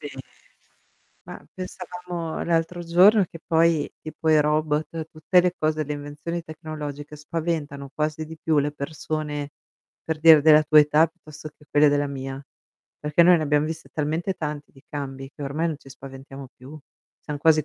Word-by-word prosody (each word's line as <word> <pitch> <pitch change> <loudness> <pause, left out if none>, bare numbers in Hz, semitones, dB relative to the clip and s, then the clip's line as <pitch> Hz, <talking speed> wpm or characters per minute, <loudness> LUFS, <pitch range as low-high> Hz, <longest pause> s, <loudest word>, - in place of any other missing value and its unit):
Sì. - - -6 1.2
Ma - - -10
pensavamo 180 -2 -6
l'altro 170 +1 -1
giorno 185 +5 +5
che 165 - -10
poi 165 -2 +2
tipo 155 +1 -5
i 155 -1 +6
robot, 155 +1 -1
tutte 160 +3 +3
le 180 0 0
cose, 155 0 0
le 150 - -4
invenzioni 145 +4 -5
tecnologiche, 150 -2 -7
spaventano 150 -3 -4
quasi 155 +1 -2
di 160 +1 -10
più 155 -1 +1
le 145 +1 0
persone, 150 0 -4 0.5
per 160 -1 -3
dire 160 -1 +8
della 155 -1 +6
tua 150 0 +7
età, 150 +2 +4
piuttosto 155 -2 -12
che 150 - -22
quelle 150 0 +5
della 145 0 +1
mia. 135 0 -6 0.5
Perché 150 +3 +3
noi 175 +1 +7
ne 155 - -1
abbiamo 150 0 +2
viste 160 0 -6
talmente 160 +5 -1
tanti 150 -2 -6
di 135 0 -20
cambi 135 -2 -6
che 145 - -9
ormai 155 +5 -1
non 155 - -4
ci 140 - -16
spaventiamo 135 0 -11
più, 140 +5 -11 0.4
siam 150 -1 -6
quasi 155 0 +4
155 Hz, 165 wpm, -24 LUFS, 145-165 Hz, 1.2 s, dire